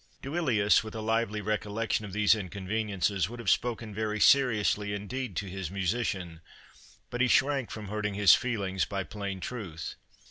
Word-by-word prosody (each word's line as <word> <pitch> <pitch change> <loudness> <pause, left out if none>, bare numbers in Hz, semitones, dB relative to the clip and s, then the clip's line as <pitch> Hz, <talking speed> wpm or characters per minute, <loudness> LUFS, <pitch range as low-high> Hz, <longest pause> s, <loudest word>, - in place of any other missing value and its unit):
Duilius, 130 -10 +2
with 110 0 -8
a - - -3
lively 110 -1 0
recollection 105 +1 -1
of 100 - -8
these 105 +1 +4
inconveniences, 100 -1 -1
would 120 +1 -8
have 115 -5 +2
spoken 115 -3 -1
very 105 0 -2
seriously 105 -6 +3
indeed 110 +1 -5
to 100 - -2
his 95 -3 -5
musician, 95 -3 -2 0.7
but 120 - -2
he 130 - +4
shrank 135 -1 +2
from 110 -2 -7
hurting 105 -1 -2
his 100 -1 +7
feelings 100 -6 0
by 100 -1 -2
plain 100 -1 -5
truth. 90 - -6
105 Hz, 155 wpm, -29 LUFS, 100-115 Hz, 0.7 s, his